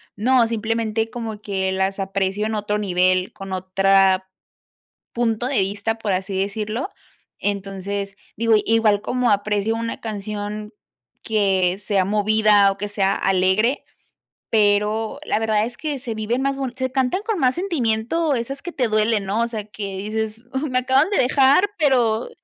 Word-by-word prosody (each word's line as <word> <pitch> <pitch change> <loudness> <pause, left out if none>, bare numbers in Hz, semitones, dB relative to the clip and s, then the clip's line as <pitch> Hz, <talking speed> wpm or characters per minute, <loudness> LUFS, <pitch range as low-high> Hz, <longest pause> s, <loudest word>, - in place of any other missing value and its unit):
no, 240 +2 +3
simplemente 225 0 -1
como 225 -3 -6
que 190 -2 -1
las 190 +1 -1
aprecio 195 +1 -1
en 220 0 -2
otro 210 0 -1
nivel, 185 -2 +1
con 195 -1 -9
otra 190 0 +2 0.8
punto 235 0 0
de 270 -3 0
vista, 205 +3 -2
por 215 -3 -1
así 190 +1 -2
decirlo. 215 - -2 0.5
Entonces, 200 0 -3 0.2
digo, 230 +1 +3
igual 220 -2 +3
como 250 +1 0
aprecio 205 +2 0
una 230 0 -4
canción 210 0 -5 0.5
que 195 -3 +1
sea 195 -2 +2
movida 210 0 +4
o 195 - -4
que 205 +1 -3
sea 195 -1 +1
alegre, 195 +7 +1 0.7
pero 210 +1 +1
la - - 0
verdad 220 -1 +1
es 240 +1 -7
que 295 -4 -3
se 235 -3 -5
viven 220 +4 -1
más 275 0 0 0.2
se 260 0 -1
cantan 265 +7 +1
con 445 -2 -1
más 255 -5 +2
sentimiento 310 - 0
esas 270 +3 -3
que 350 - -6
te 255 -7 0
duelen, 215 -1 +1
¿no? 205 +4 0
O 235 - +1
sea, 215 -3 -5
que 200 -2 -6
dices: 215 +2 -3
''Uh, 265 +3 -1
me 255 - 0
acaban 265 +6 +3
de 410 - 0
dejar, 275 +9 +4
pero'', 245 - +2
215 Hz, 160 wpm, -21 LUFS, 200-235 Hz, 0.8 s, movida